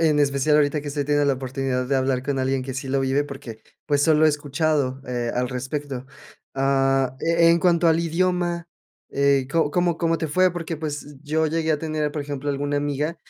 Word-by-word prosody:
En 155 -2 +3
especial 145 +1 +2
ahorita 150 0 +2
que 145 - -6
estoy 145 0 -2
teniendo 145 0 +2
la 140 - +3
oportunidad 130 0 -2
de 135 +1 +1
hablar 130 -1 0
con 140 0 -2
alguien 130 0 0
que 130 0 -6
sí 135 +1 -5
lo 135 +1 +1
vive 135 +2 +1
porque, 125 -6 -9 0.2
pues, 145 -1 +2
solo 155 0 +4
he - - +6
escuchado, 145 -2 0
eh, 120 -1 -2
al 125 0 0
respecto. 130 +1 -5 0.5
Ah, 135 -1 +1
e 170 0 +4
en 170 - +4
cuanto 170 -1 +3
al 160 0 +3
idioma, 175 0 -1 0.4
eh, 140 -1 +2
¿co 160 -1 +1
cómo 175 0 +1
cómo 165 -1 0
te 160 - -2
fue? 185 +5 +3
Porque, 165 -2 -4
pues, 145 -1 -6
yo 155 +1 0
llegué 160 0 0
a 150 - 0
tener, 155 -1 -2
por 150 - -3
ejemplo, 145 0 -4
alguna 145 +1 -2
amiga 145 +3 -1
145 Hz, 210 wpm, -23 LUFS, 135-160 Hz, 0.5 s, he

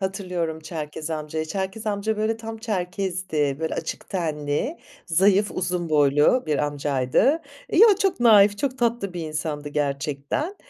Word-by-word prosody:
hatırlıyorum 180 -4 -3
Çerkez 155 -1 -6
amcayı. 155 0 -3
Çerkez 190 +5 -4
amca 210 +1 -1
böyle 215 +1 0
tam 225 0 -7
Çerkez'di, 185 - -2
böyle 160 - -2
açık 160 - -5
tenli, 155 - -2 0.3
zayıf, 195 +4 +3
uzun 180 -1 -2
boylu 150 - +4
bir 150 -2 0
amcaydı. 145 - +1 0.3
Yo, 440 +7 +8
çok 390 -9 +1
naif, 205 -3 +6
çok 265 0 -2
tatlı 235 -5 0
bir 175 - -4
insandı 150 -1 -4
gerçekten. 145 - -2
180 Hz, 135 wpm, -24 LUFS, 150-215 Hz, 0.3 s, Yo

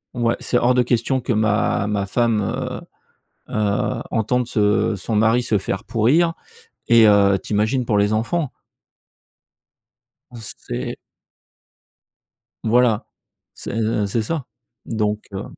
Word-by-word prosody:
ouais, 120 -1 +1
c'est 120 - 0
hors 120 +1 +3
de 125 - +4
question 120 +2 0
que 120 - -3
ma 105 -1 +1
ma 100 -2 -1
femme, 115 0 +1
heu - - -4 0.7
heu, 105 -2 0
entende 120 +2 0
ce 105 -1 +1
son 110 +4 -3
mari 115 +3 +3
se 110 - +1
faire 95 0 -4
pourrir 135 +10 +2 0.6
et 115 -2 +7
heu, 100 -1 +5
tu - - -5
imagines 110 +5 +1
pour 105 -2 +1
les 105 +1 +2
enfants 130 +7 -1 1.8
c'est 100 - -6 1.7
voilà, 115 -1 +2 0.5
c'est 110 -1 -2
c'est 115 +3 -1
ça, 150 +3 -3 0.4
donc, 105 -2 -1
heu 95 +1 -4
110 Hz, 125 wpm, -21 LUFS, 105-120 Hz, 1.8 s, et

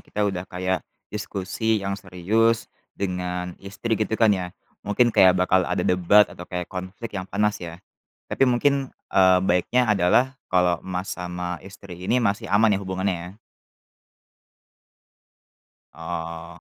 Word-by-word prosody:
kita 105 - -6
udah 95 -3 -2
kayak 95 +1 -1 0.3
diskusi 105 +1 -2
yang 100 0 -2
serius 100 +5 0 0.3
dengan 90 -2 -3
istri 100 +4 -5
gitu 110 +1 -1
kan 110 -2 +4
ya, 90 -2 -3 0.3
mungkin 115 +3 +2
kayak 95 0 +6
bakal 90 0 +2
ada - - -1
debat 90 +3 +5
atau 90 - -10
kayak 90 -1 -4
konflik 95 +5 -7
yang 90 - -6
panas 105 0 0
ya, 85 -1 -7 0.5
tapi - - 0
mungkin, 135 +2 +2 0.2
eee, 95 -1 +6
baiknya 95 +7 +2
adalah 115 +8 +3 0.2
kalau 90 -1 +3
Mas 95 +1 -4
sama 90 -1 -5
istri 95 -1 -11
ini 125 - +3
masih 100 -2 0
aman 105 +1 +4
ya - - 0
hubungannya 95 -1 -1
ya? 90 - -9 2.6
Oh. 85 0 -6
95 Hz, 135 wpm, -24 LUFS, 90-105 Hz, 2.6 s, kayak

